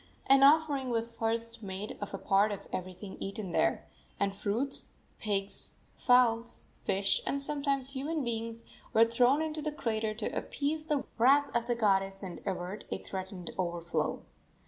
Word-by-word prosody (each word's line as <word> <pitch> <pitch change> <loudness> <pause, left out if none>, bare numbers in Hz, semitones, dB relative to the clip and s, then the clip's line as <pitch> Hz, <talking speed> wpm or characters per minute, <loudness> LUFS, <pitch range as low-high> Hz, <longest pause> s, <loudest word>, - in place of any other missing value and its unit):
An 270 0 +6
offering 285 -2 +5
was 230 -1 0
first 230 0 -1
made 195 +1 -5
of 205 - -4
a 195 - -4
part 200 +2 +3
of 200 -1 -6
everything 185 +2 -6
eaten 195 -1 -4
there, - - +1 0.3
and 200 -1 +1
fruits, 230 +8 -1 0.3
pigs, 200 -2 -1 0.2
fowls, 235 -2 +3 0.2
fish, 195 +1 +2
and 280 - 0
sometimes 280 -2 0
human 290 +3 -2
beings, 230 -1 -3 0.3
were 225 +1 +7
thrown 245 +6 +3
into 310 -1 -3
the 305 0 -2
crater 220 -6 -2
to 215 - -3
appease 305 +2 -2
the 295 -3 +1 0.2
wrath 280 +4 +5
of 235 0 +1
the 240 - +1
goddess 195 -3 +1
and 180 -2 -6
avert 185 +1 -3
a - - -2
threatened 190 -2 -6
overflow. 170 -1 -1
230 Hz, 155 wpm, -31 LUFS, 195-275 Hz, 0.3 s, were